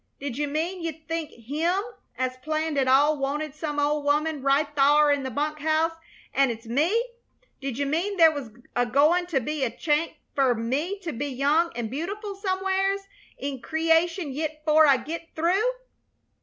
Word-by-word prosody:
Did 280 Hz, -3 st, -4 dB
you 295 Hz, +2 st, -1 dB
mean 330 Hz, +5 st, -2 dB
you 330 Hz, -1 st, -2 dB
think 320 Hz, 0 st, -5 dB
Him 305 Hz, -, -1 dB, 0.4 s
as 255 Hz, 0 st, -1 dB
planned 310 Hz, +3 st, -2 dB
it 265 Hz, -, +1 dB
all 285 Hz, +3 st, +4 dB
wanted 290 Hz, +2 st, -2 dB
some 300 Hz, -1 st, -3 dB
old 295 Hz, 0 st, +1 dB
woman 300 Hz, +1 st, +1 dB
right 275 Hz, +3 st, +3 dB
thar 295 Hz, +1 st, +5 dB
in 285 Hz, -1 st, +1 dB
the 265 Hz, -, -3 dB
bunk 300 Hz, +4 st, -2 dB
house, 315 Hz, +2 st, +2 dB, 0.4 s
an' 275 Hz, -1 st, +3 dB
it's 230 Hz, 0 st, -5 dB
me? 325 Hz, -, +1 dB, 0.5 s
Did 270 Hz, -3 st, -4 dB
you 285 Hz, -, 0 dB
mean 345 Hz, +8 st, -1 dB
there 325 Hz, -2 st, +7 dB
was 285 Hz, -6 st, -6 dB, 0.3 s
agoin' 290 Hz, +9 st, +3 dB
to 330 Hz, -6 st, +1 dB
be 295 Hz, +3 st, -3 dB
a 255 Hz, -, +1 dB
chanct 300 Hz, +7 st, -1 dB, 0.2 s
fer 265 Hz, -3 st, +3 dB
me 275 Hz, -, -2 dB
to 335 Hz, -4 st, -4 dB
be 275 Hz, +5 st, -3 dB
young 285 Hz, +6 st, +2 dB
an' 235 Hz, -2 st, -3 dB
beautiful 400 Hz, -, -4 dB
somewheres 385 Hz, 0 st, 0 dB, 0.4 s
in 275 Hz, -2 st, -5 dB
creation 325 Hz, +2 st, +1 dB
yit, 305 Hz, +2 st, -4 dB
'fore 310 Hz, 0 st, +6 dB
I 275 Hz, -2 st, +6 dB
git 330 Hz, +5 st, -6 dB
through?" 370 Hz, +9 st, +2 dB
300 Hz, 175 wpm, -26 LUFS, 275-330 Hz, 0.5 s, there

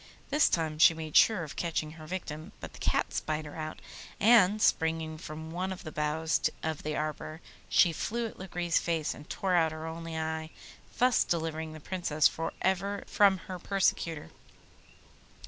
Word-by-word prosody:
This 295 Hz, +1 st, +4 dB
time 160 Hz, -2 st, -1 dB
she 165 Hz, -, +7 dB
made 160 Hz, -2 st, -7 dB
sure 215 Hz, -6 st, +6 dB
of 150 Hz, -, -8 dB
catching 160 Hz, -2 st, -2 dB
her 155 Hz, -1 st, -11 dB
victim, 155 Hz, -3 st, -6 dB
but -, -, -8 dB
the -, -, -12 dB
cat -, -, 0 dB
spied 155 Hz, 0 st, -2 dB
her 150 Hz, -, -9 dB
out, 155 Hz, -1 st, -5 dB, 0.4 s
and, 215 Hz, -2 st, +6 dB
springing 160 Hz, -4 st, +1 dB
from 160 Hz, 0 st, -7 dB
one 185 Hz, +3 st, -2 dB
of 185 Hz, 0 st, -7 dB
the 155 Hz, -, -7 dB
boughs 150 Hz, +2 st, 0 dB, 0.2 s
of 160 Hz, -1 st, -2 dB
the 155 Hz, 0 st, -3 dB
arbour 155 Hz, +1 st, -4 dB, 0.3 s
she 170 Hz, -3 st, +5 dB
flew 235 Hz, +8 st, -2 dB
at 225 Hz, -, -8 dB
Lagree's 175 Hz, -3 st, 0 dB
face 165 Hz, -3 st, -1 dB
and 150 Hz, -, -13 dB
tore 190 Hz, -2 st, -1 dB
out 165 Hz, -2 st, +4 dB
her 155 Hz, 0 st, -6 dB
only 165 Hz, 0 st, -5 dB
eye, 160 Hz, 0 st, -3 dB, 0.5 s
thus 250 Hz, 0 st, +4 dB
delivering 160 Hz, -1 st, -2 dB
the 155 Hz, -, -9 dB
Princess 155 Hz, -3 st, +2 dB
for 165 Hz, 0 st, -4 dB
ever 195 Hz, +2 st, 0 dB
from 200 Hz, -2 st, +4 dB
her 185 Hz, -1 st, -6 dB
persecutor. 170 Hz, -, 0 dB
160 Hz, 175 wpm, -30 LUFS, 155-185 Hz, 0.5 s, she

